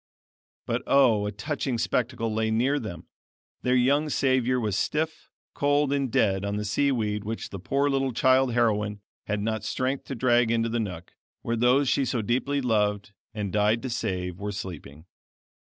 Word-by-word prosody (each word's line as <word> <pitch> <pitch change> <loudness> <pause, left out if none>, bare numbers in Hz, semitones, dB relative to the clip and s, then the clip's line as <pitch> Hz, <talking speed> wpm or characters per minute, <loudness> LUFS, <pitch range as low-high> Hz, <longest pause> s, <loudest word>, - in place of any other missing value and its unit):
But - - -1
oh! 115 -7 +4
a - - -3
touching 135 +2 -3
spectacle 115 -1 -1
lay 110 0 0
near 125 +6 +1
them; 100 - -7 0.6
their 125 0 +2
young 140 +5 +3
savior 130 -2 +2
was 105 -4 -1
stiff, 155 +6 -2 0.2
cold, 145 0 +2
and 135 -3 -1
dead 95 -2 +2
on 100 0 -2
the 105 0 -3
sea 140 +7 +1
weed 105 -4 -1
which 110 +1 -5
the 95 - -6
poor 140 +10 0
little 135 -1 +1
child 130 +2 +3
heroine 105 -3 +1 0.3
had 105 -1 -1
not 110 +1 -2
strength 130 +1 -2
to 135 - -5
drag 120 -1 +3
into 115 0 +1
the 115 +1 -1
nook, 90 -6 -5 0.3
where 115 - -1
those 125 +4 +3
she 140 - +2
so 120 -3 -1
deeply 135 +5 0
loved, 105 -4 0 0.2
and 100 -3 -3
died 105 +2 +2
to 130 - -3
save, 90 -6 -3
were 105 0 -3
sleeping. 85 -6 -8
115 Hz, 175 wpm, -26 LUFS, 105-130 Hz, 0.6 s, oh